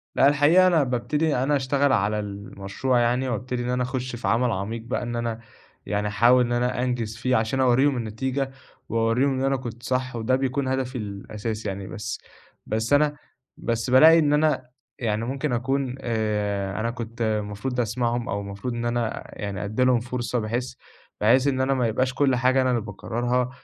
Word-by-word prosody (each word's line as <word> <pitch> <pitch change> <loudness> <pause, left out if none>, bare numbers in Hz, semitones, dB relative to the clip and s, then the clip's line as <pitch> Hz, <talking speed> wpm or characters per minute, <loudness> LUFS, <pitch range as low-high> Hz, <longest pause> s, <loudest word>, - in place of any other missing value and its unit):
لأ 135 - +5
الحقيقة 150 +6 +5
أنا 165 -5 +4
بابتدي 145 +5 0
أنا 135 +4 +1
أشتغل 140 +1 +1
على 105 +1 +1
المشروع 100 +4 -2
يعني 125 +2 +1
وابتدي 125 +2 -3
إن 120 - -3
أنا 125 0 0
أخُش 125 0 -3
في 120 - -4
عمل 120 +1 +2
عميق 110 +4 -3
بقى، 115 - -3
إن 120 0 -4
أنا 115 -1 -2 0.5
يعني 105 0 -1
أحاول 120 +4 +4
إن 120 - -4
أنا 125 +1 0
أنجِز 120 -3 -2
فيه 125 +2 +1
عشان 110 +4 0
أورّيهم 130 +2 +3
النتيجة 130 +4 -2 0.4
وأورّيهم 115 +4 +2
إن 135 - -1
أنا 135 0 +2
كنت 120 -2 -8
صح 130 -1 -1
وده 115 +3 +1
بيكون 135 +1 -1
هدفي 130 -1 -1
الأساسي 105 +1 -5
يعني، 95 -1 -4
بس 110 0 -5 0.5
بس 110 +5 -1
أنا 150 0 +3 0.4
بس 115 +1 -2
بالاقي 160 +6 +8
إن 150 -2 +3
أنا 150 -4 +1 0.3
يعني 110 -2 -1
ممكن 135 +2 -2
أكُون 130 +1 -1
آآ، 105 -4 -1
أنا 115 +1 -1
كنت 115 -1 -7
المفروض 110 +3 -2
أسمَعهم 120 +1 -1
أو 100 +1 -1
المفروض 100 +5 -5
إن 120 0 -3
أنا 120 -1 -1 0.2
يعني 100 -1 -3
أدّي 110 +5 0
لهم 125 -2 +4
فرصة 120 0 -2
بحيث 120 +3 -3 0.5
بحيث 125 +6 +4
إن 130 -2 +1
أنا 135 +1 +2
ما 125 -3 +1
يبقاش 125 +3 0
كل 135 -1 +2
حاجة 130 +2 +3
أنا 130 - +1
اللي 120 -2 +1
باقرّرها 120 +4 -2
120 Hz, 185 wpm, -24 LUFS, 110-130 Hz, 0.5 s, بالاقي